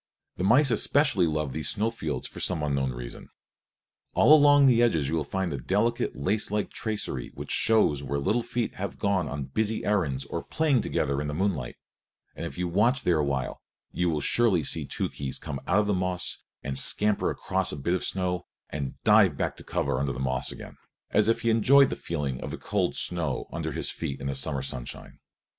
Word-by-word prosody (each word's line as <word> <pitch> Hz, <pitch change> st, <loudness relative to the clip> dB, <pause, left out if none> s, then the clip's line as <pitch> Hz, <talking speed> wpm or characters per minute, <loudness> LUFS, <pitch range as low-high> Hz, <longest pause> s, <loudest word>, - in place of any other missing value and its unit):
The 90 Hz, -, -2 dB
mice 130 Hz, +7 st, +4 dB
especially 125 Hz, -, +3 dB
love 75 Hz, -3 st, -2 dB
these -, -, 0 dB
snow 110 Hz, +3 st, 0 dB
fields 115 Hz, -, -4 dB
for -, -, -10 dB
some 75 Hz, -, -1 dB
unknown 70 Hz, -3 st, 0 dB
reason. -, -, -8 dB, 0.9 s
All 150 Hz, -, +7 dB
along 145 Hz, -2 st, +7 dB
the 120 Hz, -3 st, +5 dB
edges 80 Hz, -, +2 dB
you 80 Hz, -2 st, 0 dB
find 95 Hz, +4 st, -2 dB
the 70 Hz, -, -3 dB
delicate, 105 Hz, -, 0 dB
lacelike 105 Hz, +8 st, 0 dB
tracery 105 Hz, -, -3 dB
which -, -, -6 dB
shows 105 Hz, -11 st, +3 dB
where 70 Hz, 0 st, -3 dB
little 105 Hz, +12 st, +1 dB
feet 120 Hz, 0 st, -3 dB
have 100 Hz, +1 st, -4 dB
gone 95 Hz, -6 st, 0 dB
on 75 Hz, +1 st, -4 dB
busy 110 Hz, +12 st, -2 dB
errands 80 Hz, -11 st, 0 dB
or -, -, -4 dB
played 150 Hz, -6 st, +1 dB
together 70 Hz, +1 st, -1 dB
in 75 Hz, -, -3 dB
the 75 Hz, -, -3 dB
moonlight; 80 Hz, -9 st, -1 dB, 0.6 s
and 85 Hz, -, -4 dB
if -, -, -10 dB
you 90 Hz, 0 st, -1 dB
watch 115 Hz, +9 st, +2 dB
there 85 Hz, -6 st, +2 dB
awhile 70 Hz, -3 st, -2 dB, 0.3 s
you 90 Hz, 0 st, 0 dB
will 75 Hz, -2 st, -1 dB
surely 105 Hz, -6 st, +2 dB
see -, -, -1 dB
Tookhees 70 Hz, -2 st, -3 dB
come 70 Hz, -, -6 dB
out 100 Hz, +5 st, +4 dB
of -, -, -2 dB
the 105 Hz, -, +1 dB
moss 90 Hz, -1 st, -1 dB, 0.2 s
and 65 Hz, +1 st, 0 dB
scamper 105 Hz, +8 st, +2 dB
across 95 Hz, -1 st, 0 dB
a -, -, -5 dB
bit 80 Hz, +6 st, -1 dB
of 90 Hz, -, -1 dB
snow 90 Hz, -2 st, -1 dB, 0.2 s
and 70 Hz, -2 st, -4 dB
dive -, -, +5 dB
back -, -, -1 dB
to -, -, -11 dB
cover 65 Hz, -, -1 dB
under 70 Hz, 0 st, -1 dB
the -, -, -7 dB
moss 65 Hz, -1 st, -1 dB
again, -, -, -10 dB, 0.3 s
as 105 Hz, 0 st, +3 dB
if 115 Hz, -, +2 dB
he 115 Hz, -, +2 dB
enjoyed 135 Hz, +5 st, +5 dB
the -, -, -2 dB
feeling 70 Hz, -6 st, -4 dB
of -, -, -5 dB
the -, -, -5 dB
cold -, -, -1 dB
snow 80 Hz, -7 st, -1 dB
under -, -, -3 dB
his -, -, -2 dB
feet 70 Hz, -, -5 dB
in 70 Hz, -, -7 dB
the 70 Hz, -, -1 dB
summer 70 Hz, 0 st, 0 dB
sunshine. 65 Hz, -3 st, -7 dB
90 Hz, 200 wpm, -27 LUFS, 70-110 Hz, 0.9 s, All